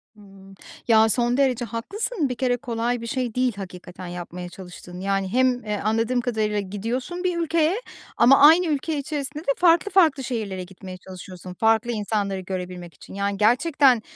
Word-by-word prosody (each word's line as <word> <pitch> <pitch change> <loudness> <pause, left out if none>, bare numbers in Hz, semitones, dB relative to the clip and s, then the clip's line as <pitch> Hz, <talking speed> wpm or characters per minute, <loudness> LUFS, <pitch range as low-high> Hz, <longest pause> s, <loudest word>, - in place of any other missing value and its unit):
Imm. 195 -1 -16 0.3
Ya, 220 -1 +5
son 240 +2 +1
derece 255 -3 +1
haklısın, 320 - -3
bir 250 - -3
kere 245 -1 0
kolay 240 -1 -2
bir 230 - -6
şey 245 -2 -2
değil 250 -2 +1
hakikaten 180 -2 -9
yapmaya 175 0 -7
çalıştığın. 180 -1 -11
Yani, 195 0 -1
hem, 250 +4 +1
e, 210 -1 -2
anladığım 225 +3 +1
kadarıyla 215 -4 -1
gidiyorsun 235 - -4
bir 360 -2 0
ülkeye 330 +1 +1 0.4
ama 260 +3 +7
aynı 325 +5 +7
ülke 305 +1 -1
içerisinde 290 +1 -4
de 280 - +1
farklı 350 +3 +4
farklı 315 -8 +4
şehirlere 210 -7 -4
gitmeye 185 0 -10
çalışıyorsun, 185 -1 -10
farklı 225 +3 +2
insanları 205 -3 -2
görebilmek 180 -2 -6
için. - - -14
Yani, 200 0 -2
gerçekten 255 +2 +4
230 Hz, 160 wpm, -23 LUFS, 195-270 Hz, 0.4 s, ama